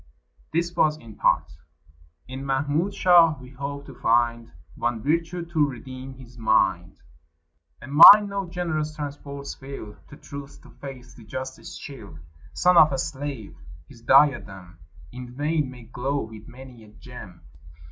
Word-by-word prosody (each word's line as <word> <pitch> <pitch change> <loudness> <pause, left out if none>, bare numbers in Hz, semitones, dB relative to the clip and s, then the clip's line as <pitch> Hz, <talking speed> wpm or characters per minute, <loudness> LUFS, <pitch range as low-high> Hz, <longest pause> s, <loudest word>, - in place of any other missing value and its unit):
[This 170 +1 -1
was 155 0 +2
in 115 -7 -14
part.] 75 - +1 0.8
"In 130 +1 -7
Mahmud 145 +7 -1
shall 170 -5 +5
we 130 -1 -13
hope 140 +1 -6
to 135 - -11
find 115 -1 0 0.2
One 120 -2 -2
virtue 165 +4 -1
to 160 -4 +1
redeem 130 +1 -9
his 125 -2 -15
mind? 95 -6 +1 0.9
A - - -9
mind 185 +9 +9
no 200 -2 -4
generous 155 -4 -3
transports 140 -1 -7
fill, 135 -6 -10
To 145 - -13
truth, 140 -1 -10
to - - -16
faith, 130 -3 -11
to 115 - -13
justice 130 +4 -8
chill. 105 - -11 0.3
"Son 180 0 +3
of 155 -2 +7
a 135 - -1
slave. 135 -6 -5 0.3
His - - -16
diadem 95 -11 +2 0.3
In 125 0 -10
vain 150 0 -1
may 125 -2 -12
glow 130 +4 -3
with 110 -1 -10
many 125 -2 -13
a - - -16
gem. 105 -6 -13
135 Hz, 145 wpm, -24 LUFS, 120-150 Hz, 0.9 s, mind